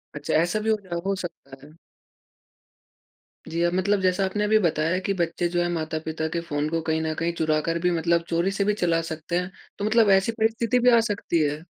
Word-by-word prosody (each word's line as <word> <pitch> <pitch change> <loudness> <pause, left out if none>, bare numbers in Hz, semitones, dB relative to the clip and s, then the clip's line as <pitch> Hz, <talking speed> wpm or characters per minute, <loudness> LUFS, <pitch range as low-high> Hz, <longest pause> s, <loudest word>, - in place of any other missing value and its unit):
अच्छा 145 -1 -3
ऐसा 175 +5 0
भी - - +1
हो 220 - +3
ज 190 - -18
अ, 175 - -4
हो 195 - 0
सकता 140 -7 -9
है। 150 +2 -17 1.7
जी, 165 +1 -2
अब 175 0 +1
मतलब 195 +2 +1
जैसा 185 +1 +2
आपने 210 +2 -1
अभी 215 +1 +4
बताया 165 -1 +1
कि 200 - +1
बच्चे 175 -1 -1
जो 175 0 0
हैं 175 - +1
माता-पिता 160 -1 -3
के - - +1
फ़ोन 150 -2 -2
को 165 0 -1
कहीं 160 0 -1
न 160 0 -1
कहीं 170 +2 -1
चुरा 155 -2 +1
कर 165 0 0
भी 180 +1 +1
मतलब 170 +1 +1
चोरी 170 +3 +1
से 200 0 0
भी 210 - +2
चला 170 -5 +1
सकते 160 +2 -3
हैं। 180 +1 -5 0.3
तो 205 - -1
मतलब 215 -1 +4
ऐसी 195 +4 +3
परिस्थिति 225 +2 +1
भी 250 - +5
आ - - +6
सकती 200 -4 -1
है? 150 +3 -2
175 Hz, 230 wpm, -24 LUFS, 160-195 Hz, 1.7 s, आ